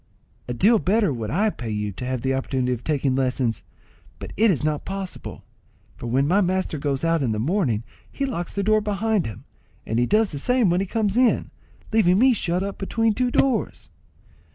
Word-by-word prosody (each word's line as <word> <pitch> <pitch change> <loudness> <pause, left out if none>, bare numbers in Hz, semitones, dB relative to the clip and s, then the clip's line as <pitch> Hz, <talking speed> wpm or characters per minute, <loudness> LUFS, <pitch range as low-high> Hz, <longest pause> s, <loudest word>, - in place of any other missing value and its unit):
"A 125 - -3
deal 215 - +4
better 200 -4 +2
would 115 -3 -4
I 210 - +1
pay 120 - -7
you 105 -1 -2
to 110 +6 -7
have 130 -2 -3
the 135 0 +1
opportunity 130 -1 -1
of 120 -1 -6
taking 140 -4 0
lessons; 130 -3 0 0.6
but - - -8
it 225 +1 +4
is 160 -6 0
not 150 -1 -1
possible, 195 -1 -6 0.5
for - - -7
when 135 +4 +1
my 195 +6 +3
master 185 -4 -1
goes 140 +1 -1
out 165 -1 +2
in 120 -5 0
the - - -2
morning 130 - 0 0.3
he 275 - -2
locks 175 -10 -4
the 200 - 0
door 215 +1 +3
behind 210 - 0
him, 105 -4 -8 0.4
and 110 +1 -1
he 120 - +2
does 215 0 +2
the 145 - -4
same 245 - +2
when 175 - +2
he 195 - -1
comes 215 +1 0
in, 250 -1 +2 0.4
leaving 185 -5 +4
me 255 +4 +5
shut 180 -3 -1
up 200 0 -5
between 225 +3 +1
two 250 +3 0
doors." 255 -1 0
175 Hz, 205 wpm, -23 LUFS, 130-210 Hz, 0.6 s, me